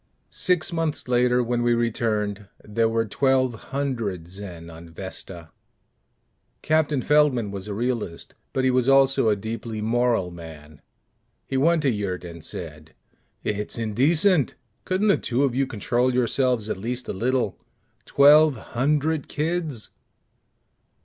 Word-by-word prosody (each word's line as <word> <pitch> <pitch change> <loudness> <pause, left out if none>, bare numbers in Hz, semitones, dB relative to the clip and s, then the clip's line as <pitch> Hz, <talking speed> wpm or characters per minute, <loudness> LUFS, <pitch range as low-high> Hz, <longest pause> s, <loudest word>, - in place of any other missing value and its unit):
Six 180 -2 0
months 165 -4 -1
later, 125 0 +3
when 120 0 -1
we 120 0 +2
returned, 105 -4 -1 0.2
there 115 +2 0
were 115 0 0
twelve 130 +3 +1
hundred 115 -11 -3
Zen 90 -3 -8
on 85 0 -11
Vesta! 85 -1 -8 1.1
Captain 155 -4 +1
Feldman 140 -8 +3
was 100 0 -6
a 105 - -4
realist 115 -7 -3 0.2
but 130 - -1
he 130 - +3
was 125 0 +2
also 135 -3 +4
a 105 - +3
deeply 110 +2 -5
moral 115 -4 +1
man. 80 -3 -12 0.6
He 135 - -5
went 160 +4 +3
to 135 - +3
Yurt 100 -5 -3
and 85 -2 -9
said, 80 -2 -8 0.5
"It's 105 +1 -2
indecent! 145 - +2 0.3
Couldn't 190 +3 +1
the 200 - +5
two 125 +3 0
of 135 -3 +1
you 135 +1 0
control 120 +2 0
yourselves 125 -2 +1
at 110 - -3
least 120 +5 -4
a - - -3
little? 120 +1 -1 0.5
_Twelve 150 +2 +6
hundred 145 +6 -1
kids! 155 -6 -2
120 Hz, 135 wpm, -24 LUFS, 105-135 Hz, 1.1 s, Twelve